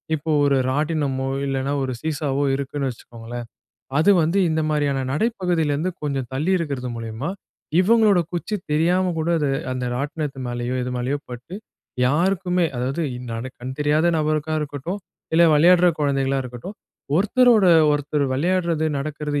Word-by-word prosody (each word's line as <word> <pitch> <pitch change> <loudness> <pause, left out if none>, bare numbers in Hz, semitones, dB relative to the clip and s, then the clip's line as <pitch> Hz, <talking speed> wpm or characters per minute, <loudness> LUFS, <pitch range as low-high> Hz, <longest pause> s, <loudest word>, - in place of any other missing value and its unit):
இப்போ 155 +1 -3
ஒரு 140 -1 +3 0.2
ராட்டினமோ 145 -2 -1 0.2
இல்லன்னா 135 0 -1
ஒரு 130 -1 -2
சீசாவோ 145 -3 -1
இருக்குன்னு 140 0 -3
வச்சுக்கோங்களேன். 120 0 -8 0.5
அது 165 +6 +5
வந்து 165 +5 +1
இந்த 160 0 0
மாரியான 145 -3 +1
நடைப்பகுதியில 175 -5 0
இருந்து 165 +6 -1
கொஞ்சம் 135 -3 -2
தள்ளி 150 +7 -1
இருக்கிறது 140 -6 -3
மூலியமா 115 +5 -5 0.5
இவங்களோட 210 -1 +4
குச்சி 175 +5 -3 0.2
தெரியாம 175 +4 +2
கூட 160 +1 -1
அது 145 -3 0 0.2
அந்த 125 0 -3
ராட்டினத்து 145 +1 -3
மேலேயோ 120 +1 -3
எது 125 - -3
மேலயோ 130 +4 -1
பட்டு 125 +8 -8 0.5
யாருக்குமே, 180 +4 +1
அதாவது 130 +7 -2 0.6
கண் 130 +1 -5
தெரியாத 150 +2 +2
நபருக்கா 155 0 0
இருக்கட்டும் 150 +6 -4 0.4
இல்ல 170 +1 +6
விளையாடுற 175 +4 +6
கொழந்தைகளா 135 -2 +1
இருக்கட்டும் 125 - -8 0.4
ஒருத்தரோட 225 +3 +4 0.3
ஒருத்தர் 145 0 0
விளையாட்றது 170 +1 +1
நடக்றது 150 0 -3
150 Hz, 135 wpm, -22 LUFS, 135-170 Hz, 0.6 s, இல்ல